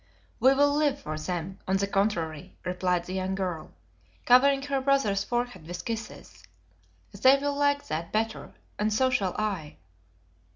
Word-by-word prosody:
"We'll 275 +4 +4
live 290 -2 +1
for 155 - -5
them, 175 +4 -4
on 190 +1 +2
the 200 - 0
contrary," 185 -4 -1
replied 180 -1 0
the 185 - -6
young 190 0 -2
girl, 180 -4 -3 0.6
covering 275 +2 +5
her 275 -1 -1
brother's 260 -8 +2
forehead 240 -9 -3
with 175 +1 -6
kisses. 215 - -7 0.7
"They 260 +7 +5
will 285 +1 -1
like 285 0 +1
that 165 +2 -4
better, 220 +1 -2 0.3
and 215 +1 +1
so 260 +5 +2
shall 195 -7 0
I." 195 -8 -3
205 Hz, 150 wpm, -27 LUFS, 180-265 Hz, 0.7 s, covering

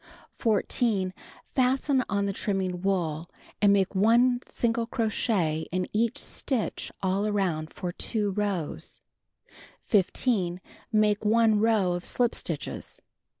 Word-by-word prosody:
14. 210 -3 +1 0.4
Fasten 260 +1 +2
on 200 -1 0
the 200 - -1
trimnung 185 -3 -2
wool, 170 -4 -1 0.3
and 205 -1 +6
make 195 -1 +2
1 240 +5 +4
single 230 -1 -1
crochet 205 -9 0
in 185 +1 -1
each 225 +1 +1
stitch 255 -6 -2
all 195 +2 +1
around 180 -7 -1
for 180 - -4
2 205 +2 -1
rows. 195 -5 -3 0.9
15. 190 -3 +1 0.3
Make 215 -1 +2
1 220 0 +4
row 215 -4 +3
of 175 0 -4
slip 240 +4 +1
stitches. - - -5
205 Hz, 115 wpm, -27 LUFS, 185-230 Hz, 0.9 s, and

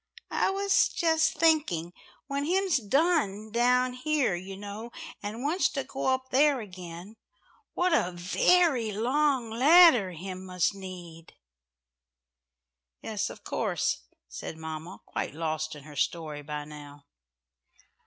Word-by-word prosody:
"I - - +1
was 395 +1 +3
just 320 -2 +1
thinking, 295 - +2 0.3
when 280 +1 -2
Him's 375 0 +2
done 225 - +1
down 250 +2 +2
here, 285 -3 0
you 190 +2 -6
know, 205 +3 -7 0.3
and 215 +4 -5
wants 325 +6 +2
to 275 - -2
go 270 - -4
up 260 0 0
there 280 +1 +4
again, 185 0 -9 0.6
what 355 -1 +2
a 185 - +2
very 235 - +2
long 255 +2 +1
ladder 255 - +6
Him 185 +2 -7
must 180 0 0
need." 180 -4 -10 1.7
"Yes, - - -2
of - - -11
course," - - -1 0.2
said 65 - -7
mamma, 160 +3 -7
quite - - -4
lost 155 -1 -3
in 145 - -11
her 150 0 -12
story 155 0 -2
by 150 0 -5
now. 145 -1 -12
215 Hz, 125 wpm, -28 LUFS, 175-285 Hz, 1.7 s, ladder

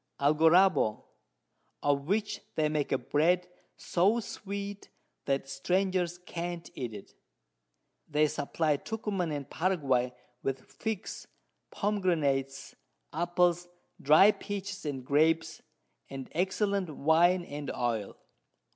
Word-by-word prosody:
Algaroba, 160 - +4 0.8
of 140 0 +1
which 210 +3 0
they 155 -1 +2
make 150 -2 -1
a - - +3
Bread 165 +8 +1 0.3
so 195 +7 +2
sweet, 200 -2 -6 0.4
that 135 0 0
Strangers 180 +5 0
can't 175 -1 -6
eat 125 -3 -4
it. 100 - -11 1.0
They 150 0 +3
supply 150 +1 0
Tucuman 200 -2 -3
and 145 -2 -4
Paraguay 135 -9 0 0.3
with 135 -1 -2
Figs, 220 -4 -5 0.4
Pomgranates, 155 -10 0 0.4
Apples, 175 +1 +1 0.3
dry'd 160 +9 +6
Peaches 200 -3 -5
and 135 -3 -4
Grapes, 160 +3 +2 0.5
and 135 -1 -7
excellent 190 +2 0
Wine 170 +4 +3
and 145 -2 -6
Oil. 115 -4 -2
165 Hz, 100 wpm, -30 LUFS, 140-185 Hz, 1.0 s, dry'd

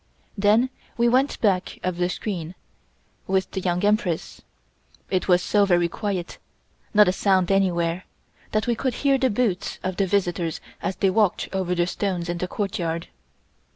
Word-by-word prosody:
Then 215 +5 +3 0.3
we 235 0 +3
went 260 +4 +2
back 190 -5 +1
of 185 -1 -1
the 175 0 +1
screen, 180 -2 -4 0.7
with 190 0 0
the 190 - -3
Young 180 +1 0
Empress. 205 -6 0 0.7
It 185 -2 0
was 180 -1 +4
so 205 -1 +3
very 175 -3 +3
quiet, 190 -1 -4 0.5
not 210 -2 +6
a - - +4
sound 190 -2 +2
anywhere, 180 -2 +1 0.5
that 215 0 +1
we 240 - +1
could 255 +2 -2
hear 275 -1 +4
the 260 0 +2
boots 205 -4 -1
of 185 -1 -3
the 195 - +1
visitors 175 -4 0 0.2
as 190 - -2
they 195 - +2
walked 210 -2 +1
over 185 -2 0
the 175 0 +2
stones 180 -2 -2
in 175 0 -2
the 180 - -2
courtyard. 170 -5 -3
190 Hz, 165 wpm, -24 LUFS, 175-210 Hz, 0.7 s, not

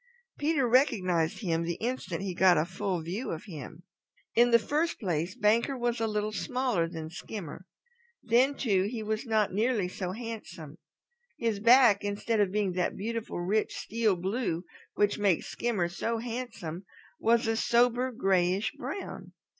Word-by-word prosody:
Peter 295 -4 +2
recognized 185 - +2
him 165 -5 0
the 170 0 -2
instant 195 -7 -3
he 190 -2 -3
got 180 0 +5
a 155 - +2
full 185 -1 -3
view 195 +10 -4
of 160 - -4
him. 160 - -9 0.5
In 240 +1 +5
the 235 - +7
first 300 +9 -1
place 175 -2 -2
Banker 230 +4 +2
was 240 -1 -1
a 225 - +1
little 210 0 -1
smaller 250 -6 0
than 160 -1 -7
Skimmer. 180 -1 -8 0.6
Then 255 +5 +3
too, 195 -9 +1
he 225 -2 -4
was 215 +3 -3
not 215 -4 +1
nearly 215 -2 +1
so 180 0 -4
handsome. 210 -9 -8 0.6
His 225 -4 -1
back, 235 -2 +6
instead 205 +2 -1
of 200 -3 +2
being 205 -2 0
that 180 0 -1
beautiful 225 -2 -4
rich 205 +5 0
steel 220 -3 0
blue 185 -1 -2 0.3
which 205 0 +1
makes 195 -5 +2
Skimmer 220 -8 -1
so 225 +6 -2
handsome, 225 -8 -5 0.4
was 230 +1 +3
a 225 0 +1
sober 245 +2 +2
grayish 190 -3 +1
brown. 285 +11 -7
210 Hz, 155 wpm, -29 LUFS, 180-235 Hz, 0.6 s, the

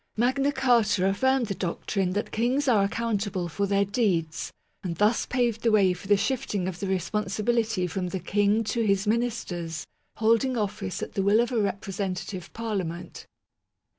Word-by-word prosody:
Magna 260 +5 +2
Carta 235 -8 +3
affirmed 260 +6 +2
the 200 - -3
doctrine 185 +1 -2
that 205 +2 -2
kings 250 +6 +1
are 220 -6 +4
accountable 205 -3 -1
for 200 +5 -1
their 200 0 +2
deeds, 180 -8 0 0.3
and 175 -3 -3
thus 210 +6 +2
paved 240 -3 0
the 230 - +2
way 195 -4 +4
for 185 - -10
the 205 0 +5
shifting 205 -6 -1
of 180 -2 -5
the 200 - -3
responsibility 210 +2 0
from 180 +1 -3
the 190 +1 -3
King 205 +4 +2
to 230 +2 -1
his 200 -2 +2
ministers, 205 -8 -2 0.3
holding 230 +3 +2
office 195 - -3
at - - -6
the 195 - 0
will 200 +3 +4
of 240 +2 +1
a 235 -3 +1
Representative 195 -2 -3
Parlia 220 -5 -2
ment. 175 +2 -8
205 Hz, 165 wpm, -26 LUFS, 190-230 Hz, 0.3 s, the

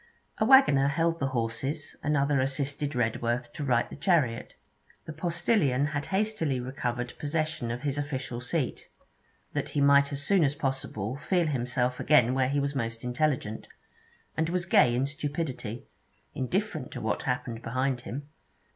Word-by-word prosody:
A 215 - +3
waggoner 230 - +6
held 165 +3 +1
the 135 - 0
horses, 135 +4 -2
another 145 -1 +2
assisted 140 +1 -2
Redworth 120 +1 -1
to 150 - -5
right 120 -4 +2
the - - -9
chariot. 145 -8 +1 0.5
The 155 - -6
postillion 160 - +1
had 145 -1 -2
hastily 190 -9 0
recovered 125 -1 -3
possession 155 -4 -2
of 120 +3 -4
his 145 0 -1
official 130 -4 -4
seat, 130 +2 -2 0.7
that - - -2
he - - -1
might 140 0 +5
as 140 0 -3
soon 190 +2 +4
as 145 0 +1
possible 130 -5 -3
feel 175 +3 +1
himself 125 -3 -1
again 125 -5 +4
where 130 -1 +2
he 145 +1 +1
was 140 0 -1
most 115 -4 -3
intelligent, 125 -3 -1 0.7
and 160 0 0
was 180 0 -1
gay 120 -8 +5
in 130 +2 +1
stupidity, 145 -5 -4 0.5
indifferent 155 - -2
to - - -5
what 110 - -1
happened 125 -3 -2
behind 130 +1 -1
him. 140 +3 -6
140 Hz, 155 wpm, -28 LUFS, 125-150 Hz, 0.7 s, waggoner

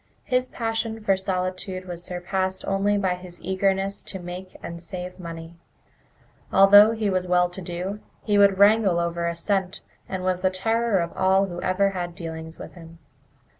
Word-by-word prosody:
His 255 -1 0
passion 225 -2 -3
for 195 -2 +3
solitude 185 0 -3
was 175 -1 -6
surpassed 185 +1 -3
only 200 +1 +1
by 190 -2 +1
his 180 -1 -10
eagerness 195 +1 0
to 190 - -5
make 180 +1 -8
and 170 0 -7
save 180 +2 -7
money. 165 -1 -8 0.9
Although 205 +3 +8
he 220 -2 -1
was 185 -1 -1
well 180 0 +3
to 190 - -7
do, 180 +4 -4 0.2
he 205 -2 +2
would 200 -1 +5
wrangle 200 -3 +5
over 170 0 -1
a 170 - -2
cent, 190 +1 -1 0.3
and 185 -1 -4
was 185 -1 0
the 185 - +3
terror 225 +3 +1
of 170 -1 -2
all 190 +1 +3
who 175 -2 -6
had - - -7
ever 195 +2 +2
had 175 -2 -4
dealings 160 -1 -7
with - - -10
him. 165 -1 -13
185 Hz, 175 wpm, -24 LUFS, 175-200 Hz, 0.9 s, Although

